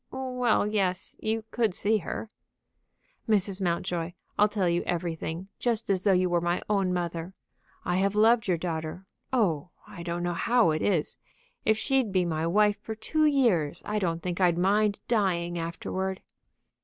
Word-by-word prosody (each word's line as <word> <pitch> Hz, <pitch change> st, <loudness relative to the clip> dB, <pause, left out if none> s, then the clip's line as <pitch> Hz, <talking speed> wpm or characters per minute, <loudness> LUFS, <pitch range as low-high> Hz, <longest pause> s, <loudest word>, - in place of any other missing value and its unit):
"Well, 250 Hz, -4 st, 0 dB
yes; 195 Hz, -4 st, 0 dB
you 220 Hz, 0 st, -1 dB
could 225 Hz, -6 st, +1 dB
see 215 Hz, +2 st, +2 dB
her." 210 Hz, +4 st, -5 dB, 1.0 s
"Mrs. 200 Hz, -2 st, +1 dB
Mountjoy, 175 Hz, -1 st, -1 dB, 0.2 s
I'll 210 Hz, -, +5 dB
tell 200 Hz, -3 st, 0 dB
you 170 Hz, 0 st, +1 dB
everything, 170 Hz, +1 st, -3 dB
just 230 Hz, -4 st, 0 dB
as 190 Hz, -2 st, +1 dB
though 200 Hz, -, +3 dB
you 185 Hz, -1 st, +3 dB
were 175 Hz, -1 st, +1 dB
my 175 Hz, +1 st, 0 dB
own 195 Hz, -3 st, +1 dB
mother. 175 Hz, 0 st, -3 dB, 0.5 s
I 180 Hz, 0 st, +1 dB
have 195 Hz, +2 st, +1 dB
loved 225 Hz, +1 st, +4 dB
your 180 Hz, -2 st, +2 dB
daughter; 165 Hz, +1 st, -4 dB, 0.3 s
oh, 180 Hz, -, +1 dB, 0.2 s
I 175 Hz, -, -9 dB
don't 170 Hz, 0 st, -3 dB
know 175 Hz, 0 st, 0 dB
how 230 Hz, +1 st, +3 dB
it 155 Hz, 0 st, -1 dB
is! 175 Hz, -7 st, 0 dB, 0.5 s
If 220 Hz, 0 st, +3 dB
she'd 260 Hz, -1 st, +1 dB
be 185 Hz, -2 st, +2 dB
my 160 Hz, -1 st, -1 dB
wife 205 Hz, +3 st, +3 dB
for 220 Hz, 0 st, -5 dB
two 310 Hz, +8 st, +1 dB
years, 230 Hz, -, +2 dB
I 210 Hz, 0 st, -1 dB
don't 170 Hz, -4 st, -1 dB
think 180 Hz, +1 st, -3 dB
I'd 175 Hz, -2 st, +4 dB
mind 200 Hz, +3 st, +2 dB
dying 175 Hz, -6 st, +1 dB
afterward." 190 Hz, +3 st, -3 dB
190 Hz, 165 wpm, -28 LUFS, 175-215 Hz, 1.0 s, I'll